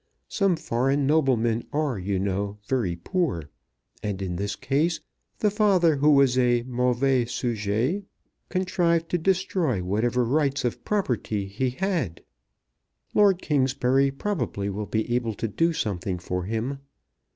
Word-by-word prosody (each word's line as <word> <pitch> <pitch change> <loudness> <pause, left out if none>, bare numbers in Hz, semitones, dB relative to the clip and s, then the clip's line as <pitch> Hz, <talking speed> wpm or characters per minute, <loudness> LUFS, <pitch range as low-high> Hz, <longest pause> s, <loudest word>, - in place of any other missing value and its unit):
Some 195 -3 +2
foreign 135 0 0
noblemen 125 -6 +2
are, 145 -7 -1
you 95 +1 -1
know, 100 +2 -2
very 115 -10 0
poor; 85 - -2 0.5
and 100 -2 -3
in 95 -3 -3
this 100 +2 -2
case 145 +8 0 0.4
the 210 - +2
father, 190 -7 +3
who 145 +2 +4
was 135 -3 +5
a 120 -1 +3
"mauvais 125 +1 +1
sujet," 120 - -1 0.5
contrived 175 -3 +1
to 175 - 0
destroy 175 - 0
whatever 120 +6 +1
rights 140 +1 +1
of 120 - -2
property 120 - -1
he 110 +7 -1
had. 145 - -2 0.9
Lord 200 -3 +4
Kingsbury 135 -1 +2
probably 135 - -2
will 105 +1 -4
be 110 +3 -1
able 115 -3 0
to 115 - -2
do 165 +11 +1
something 100 - -2
for 90 0 -3
him. 115 +6 -2
125 Hz, 135 wpm, -25 LUFS, 105-160 Hz, 0.9 s, was